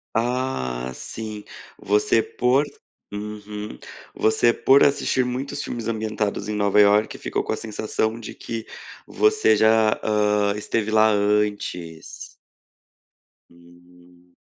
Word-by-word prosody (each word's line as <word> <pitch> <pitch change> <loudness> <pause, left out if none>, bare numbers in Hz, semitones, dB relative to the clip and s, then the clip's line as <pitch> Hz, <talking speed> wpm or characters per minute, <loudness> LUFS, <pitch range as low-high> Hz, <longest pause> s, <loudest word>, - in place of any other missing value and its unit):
Ah, 115 - -2
sim. 110 - -7 0.4
Você 105 +2 +2
por 125 +5 +1 0.5
uhum. 105 -4 -7 0.3
Você, 120 +2 +2
por 135 +1 +5
assistir 130 -2 +2
muitos 135 +3 -4
filmes 115 -2 -5
ambientados 110 -2 -2
em 105 - -3
Nova 105 0 +2
Iorque, 105 +1 +4
ficou - - -3
com - - -4
a - - -1
sensação 110 +1 -3
de 115 - -9
que 115 -1 -6 0.4
você 430 0 +3
já, 110 0 +3
hã, 105 -1 +1
esteve 105 +1 -2
lá 110 0 +5
antes. 100 -5 -2 1.2
Hum. 85 0 -22
105 Hz, 110 wpm, -23 LUFS, 100-115 Hz, 1.2 s, por